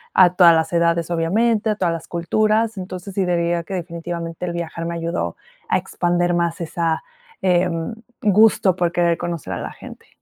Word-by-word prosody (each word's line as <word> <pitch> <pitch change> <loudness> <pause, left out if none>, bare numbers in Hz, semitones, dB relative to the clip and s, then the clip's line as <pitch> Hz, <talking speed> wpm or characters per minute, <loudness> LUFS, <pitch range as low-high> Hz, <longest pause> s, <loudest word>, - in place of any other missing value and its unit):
a 180 -1 +6
todas 175 -2 +7
las 160 +1 0
edades 170 0 +2
obviamente, 215 +7 +1
a - - -1
todas 175 -4 0
las 165 - -6
culturas, 215 +5 +1
entonces 185 +1 -7
sí 190 -1 0
diría 170 -1 0
que 190 - -5
definitivamente 170 0 -5
el 175 - -3
viajar 165 -1 -4
me 170 0 -3
ayudó 165 - -3 0.3
a - - +3
expandir 175 0 0
más 170 -1 0
esa, 165 0 -1 0.4
em, 175 0 +1 0.3
gusto 205 -3 +4
por 175 -2 0
querer 170 -1 +2
conocer 165 - -4
a - - -3
la - - -5
gente. - - -12
175 Hz, 175 wpm, -21 LUFS, 170-185 Hz, 0.4 s, todas